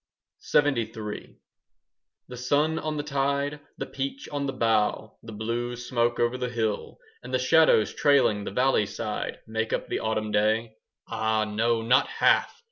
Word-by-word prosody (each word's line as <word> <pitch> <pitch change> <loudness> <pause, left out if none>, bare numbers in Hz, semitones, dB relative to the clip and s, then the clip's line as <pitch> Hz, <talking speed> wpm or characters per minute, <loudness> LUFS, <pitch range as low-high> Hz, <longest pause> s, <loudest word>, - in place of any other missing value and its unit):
LXXIII 115 -7 0 0.9
The 125 - -8
sun 145 +6 +1
on 155 -1 -3
the 145 - -2
tide, 140 0 -1 0.2
the - - -3
peach 135 0 -5
on 145 -1 -2
the - - -1
bough, 110 -2 0
The 115 - -10
blue 115 +3 -3
smoke 120 -1 -1
over 120 +2 +1
the 125 -1 -2
hill, 110 -3 -2 0.2
And 125 - -9
the 130 - +2
shadows 130 -5 +4
trailing 135 -8 +3
the - - -4
valley 125 -1 +2
side, 100 - -4
Make 110 0 -2
up - - -2
the - - -1
autumn 110 -1 -2
day. 110 +2 +1 0.3
Ah, 110 -1 0
no, 115 +2 0
not 125 +3 +4
half! - - +3
120 Hz, 155 wpm, -26 LUFS, 110-135 Hz, 0.9 s, shadows